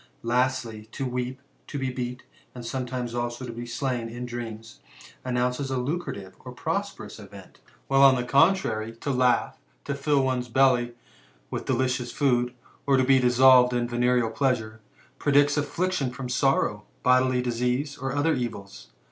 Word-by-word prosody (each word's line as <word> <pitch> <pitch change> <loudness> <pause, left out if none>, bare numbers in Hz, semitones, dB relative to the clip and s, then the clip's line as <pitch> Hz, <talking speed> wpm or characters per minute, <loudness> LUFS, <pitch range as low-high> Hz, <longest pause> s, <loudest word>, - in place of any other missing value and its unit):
Lastly, 120 -2 -1
to 135 - -3
weep^ 125 +1 -3 0.3
to 145 - -5
be^beat, 125 -1 -3 0.3
and 120 -1 -8
sometimes 125 -1 -4
also 120 +1 -3
to 120 - -6
be 120 +1 -7
slain, 120 -2 -2
in 120 +2 -6
dneftmiB, 115 -2 -7 0.4
announce 125 0 0
alucimttve 130 - -3
and 125 0 -9
prosperous 200 - -4
event; 100 -2 -13 0.3
while, 135 0 +3
on 135 -1 +8
the 125 - -1
contrary, 125 - +2
to 130 +5 -4
hiugh, 125 -2 +2 0.3
to 140 - -2
fill 140 -1 +1
the 125 -1 -2
belly 120 -1 +3 0.6
with - - -4
delicious 125 -1 0
food, 125 -3 +1 0.3
or 135 -1 +4
to 130 - +3
be 135 0 +5
dissolved 125 0 +6
in 120 -1 0
venereal 120 -1 +1
pleasure, 115 -4 -1 0.4
predict 145 0 +3
affliction 165 -1 -1
from 125 0 -7
sorrow, 125 -5 +1 0.2
bodily 130 0 +3
disease, 125 +4 -1
and 135 0 -2
other 155 +2 +2
^ils.' 115 -6 -6
125 Hz, 145 wpm, -26 LUFS, 120-135 Hz, 0.6 s, on